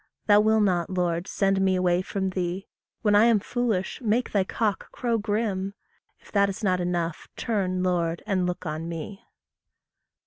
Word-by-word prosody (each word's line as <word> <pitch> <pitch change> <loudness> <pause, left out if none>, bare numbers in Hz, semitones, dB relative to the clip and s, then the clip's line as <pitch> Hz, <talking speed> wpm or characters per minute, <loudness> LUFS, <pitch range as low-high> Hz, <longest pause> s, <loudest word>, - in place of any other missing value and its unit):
Thou 205 -1 +6
will 220 +1 +4
not, 180 -4 +1
Lord, 175 -1 -1
send 195 -1 +1
me 190 -1 +3
away 180 -1 +2
from 190 0 -2
thee. 185 +1 -3 0.4
When 210 -2 +3
I 205 +2 +6
am 230 -3 +5
foolish, 225 -3 -2
make 235 +2 0
thy 200 -2 +2
cock 210 +1 -2
crow 235 -2 -1
grim; 205 -2 -1 0.4
If - - -19
that 200 -1 +3
is 195 +3 -6
not 185 -2 +2
enough, 175 -2 -2
turn, 185 -5 -1
Lord, 170 -2 0
and 190 -4 0
look 180 +1 -4
on 155 +1 -4
me. 170 +4 -6
190 Hz, 170 wpm, -26 LUFS, 180-210 Hz, 0.4 s, Thou